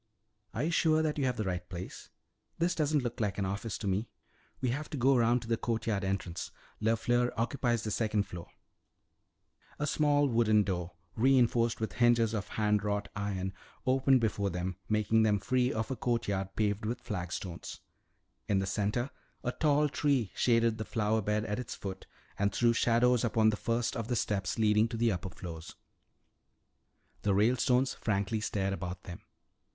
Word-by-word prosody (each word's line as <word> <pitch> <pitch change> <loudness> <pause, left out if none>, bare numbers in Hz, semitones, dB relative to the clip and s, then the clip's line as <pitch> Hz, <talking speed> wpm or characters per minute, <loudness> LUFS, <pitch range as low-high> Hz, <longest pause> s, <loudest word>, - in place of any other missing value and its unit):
"Are 120 - -1
you 165 - 0
sure 160 -1 +3
that 150 -1 -1
you 135 - +1
have 125 -2 0
the 110 - -1
right 90 -2 -3
place? 90 0 -8 0.5
This 170 +2 +1
doesn't 150 -3 +1
look 120 -1 -4
like 105 -4 -1
an 100 - 0
office 100 +3 -3
to - - -7
me." 100 +4 -1 0.5
"We 130 - 0
have 145 +5 -3
to 150 - -4
go 135 +2 +4
around 120 0 +3
to - - -10
the 115 0 +1
courtyard 110 -3 -1
entrance. 95 -3 -3 0.3
LeFleur 120 +2 +2
occupies 120 -1 0
the 110 - -3
second 110 -1 +1
floor." 90 -4 -9 1.3
A 150 - -1
small 145 -1 +3
wooden 110 -4 +3
door, 90 -3 -3 0.2
reinforced 120 -2 +3
with 110 - -3
hinges 120 -2 +3
of 105 -3 -2
hand 105 -1 +1
wrought 105 0 -1
iron, 95 -2 -3 0.3
opened 130 0 +4
before 100 -3 0
them, 90 +1 -3
making 110 +1 +3
them 105 -2 +3
free 125 +5 +1
of 110 +4 -2
a - - -1
courtyard 100 -6 -1
paved 105 -1 0
with 115 +3 -2
flagstones. 90 -4 -5 0.7
In 100 - +2
the 95 - +1
center 105 +6 -1 0.3
a 125 - 0
tall 150 +1 +2
tree 140 -8 +1
shaded 115 -2 +2
the - - -1
flower 110 -1 0
bed 105 +1 0
at 105 +2 -2
its 125 - -5
foot 95 -2 -7 0.3
and 100 0 +2
threw 120 -1 +3
shadows 120 +1 +3
upon 110 -2 +3
the - - -1
first 115 +2 -1
of 115 -1 -3
the 120 - 0
steps 100 -4 -1
leading 110 0 +4
to 115 0 -5
the 115 0 +2
upper 95 0 -3
floors. 85 -2 -8 1.5
The 100 -2 +1
Ralestones 125 +4 +3
frankly 105 +1 -1
stared 100 -2 -1
about 90 -2 -5
them. 85 - -9
110 Hz, 175 wpm, -31 LUFS, 100-120 Hz, 1.5 s, go